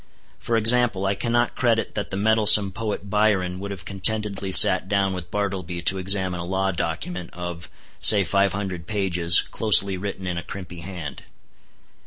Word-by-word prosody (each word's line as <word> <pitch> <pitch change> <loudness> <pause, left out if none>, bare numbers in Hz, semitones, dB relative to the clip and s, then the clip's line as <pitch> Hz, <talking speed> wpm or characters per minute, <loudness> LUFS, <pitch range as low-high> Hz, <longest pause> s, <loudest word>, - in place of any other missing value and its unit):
For 115 - -3
example, 115 -3 +1
I 95 - -1
cannot 120 +3 -2
credit 115 -2 -2
that 105 - -5
the 95 - -6
mettlesome 105 -1 +4
poet 105 -1 -6
Byron 100 -4 -1
would 100 +1 -8
have 95 -2 -10
contentedly 100 0 0
sat 95 0 +7
down 100 -1 -1
with 90 -2 -9
Bartleby 90 -4 -5
to 95 +2 +2
examine 95 -1 -3
a - - -6
law 95 +2 -3
document 85 0 -6
of, 85 -1 -9 0.3
say 105 -2 +6
five 100 +2 0
hundred 95 -4 -7
pages, 90 -5 +2
closely 100 -3 +3
written 95 0 -8
in 90 -1 -4
a - - -11
crimpy 90 -2 -10
hand. 85 -5 -9
95 Hz, 165 wpm, -21 LUFS, 90-105 Hz, 0.3 s, sat